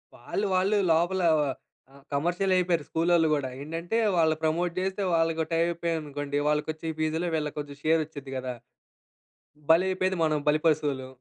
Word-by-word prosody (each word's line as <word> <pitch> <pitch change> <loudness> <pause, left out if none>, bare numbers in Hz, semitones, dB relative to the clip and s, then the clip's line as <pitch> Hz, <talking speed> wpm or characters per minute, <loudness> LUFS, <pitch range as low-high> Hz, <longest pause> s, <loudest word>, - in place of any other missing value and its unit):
వాళ్ళు, 205 - -3
వాళ్ళు 195 +3 +2
లోపల 175 +3 +2 0.7
ఆహ్, 140 0 -17
కమర్షియల్ 175 +6 +1
అయిపోయారు. 175 -4 +1
స్కూలోళ్ళు 165 0 +3
గూడా. 140 -3 -1
ఏంటంటే 165 +8 -3 0.2
వాళ్ళు 160 -1 +3
ప్రమోట్ 170 +2 0
జేస్తే 190 +1 -2
వాళ్ళకి 165 -1 +1
టై 165 - +1
అయిపోయయి 170 -1 -1
అనుకోండి 145 -1 -3
వాళ్ళకొచ్చే 155 +2 -1
ఫీజులే 160 +2 0
వీళ్ళకి 150 -1 -3
కొంచెం 145 -1 -7
షేర్ 160 +1 +3
వచ్చుద్ది 145 -3 -9
గదా! 130 -1 -4 1.2
బలి 175 +3 +5
అయిపోయేది 185 -1 0
మనం, 155 -1 +1
బలిపసువులు. 150 -4 +1
160 Hz, 145 wpm, -27 LUFS, 150-175 Hz, 1.2 s, బలి